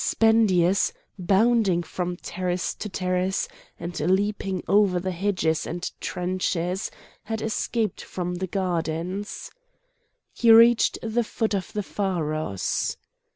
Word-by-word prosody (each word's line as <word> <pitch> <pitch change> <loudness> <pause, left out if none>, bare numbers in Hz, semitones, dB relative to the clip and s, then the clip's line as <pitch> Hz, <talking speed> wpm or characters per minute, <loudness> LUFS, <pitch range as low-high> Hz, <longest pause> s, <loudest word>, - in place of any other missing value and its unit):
Spendius, 200 -5 +3 0.3
bounding 195 -1 +3
from 180 0 -4
terrace 180 0 -2
to 210 - -6
terrace, 185 0 -1 0.3
and 170 +1 -5
leaping 190 +2 0
over 200 -3 +4
the 185 +1 -2
hedges 180 -4 0
and 175 +2 -4
trenches, 180 +1 -1 0.4
had 220 +1 -3
escaped 220 0 -1
from 180 -1 -4
the 185 +1 -3
gardens. 180 +1 -3 0.8
He 235 - +2
reached 230 +1 +6
the 225 +1 0
foot 220 0 -2
of 190 -4 -2
the 210 - -2
pharos. 155 - -2
185 Hz, 110 wpm, -25 LUFS, 175-210 Hz, 0.8 s, reached